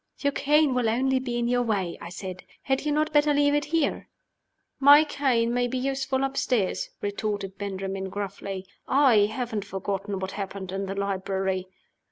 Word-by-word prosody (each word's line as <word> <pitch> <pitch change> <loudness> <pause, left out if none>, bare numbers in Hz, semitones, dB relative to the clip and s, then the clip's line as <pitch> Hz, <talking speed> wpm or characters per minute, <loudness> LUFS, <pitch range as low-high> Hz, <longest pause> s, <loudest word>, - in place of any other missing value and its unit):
"Your 285 -1 0
cane 295 -1 +3
will 245 -3 +1
only 260 +3 +2
be 245 -2 -3
in 240 0 0
your 245 0 +2
way," 200 -7 -1
I 170 - -7
said. 185 0 -7 0.2
"Had 270 +1 0
you - - +2
not 305 +1 +1
better 295 0 +4
leave 285 0 +3
it 295 0 +1
here?" 315 -1 0 0.7
"My 285 +2 +8
cane 255 -6 +1
may 245 0 +1
be 255 +2 -3
useful 265 0 -1
upstairs," 255 -6 0
retorted 205 -2 -3
Benjamin, 195 -1 -4
gruffly. 195 -1 -5 0.2
"I 255 -7 +5
haven't 220 -2 -3
forgotten 195 0 -3
what 190 0 -4
happened 195 -2 -5
in 195 +1 -3
the 195 - -4
library." 190 -1 -1
225 Hz, 170 wpm, -26 LUFS, 195-270 Hz, 0.7 s, My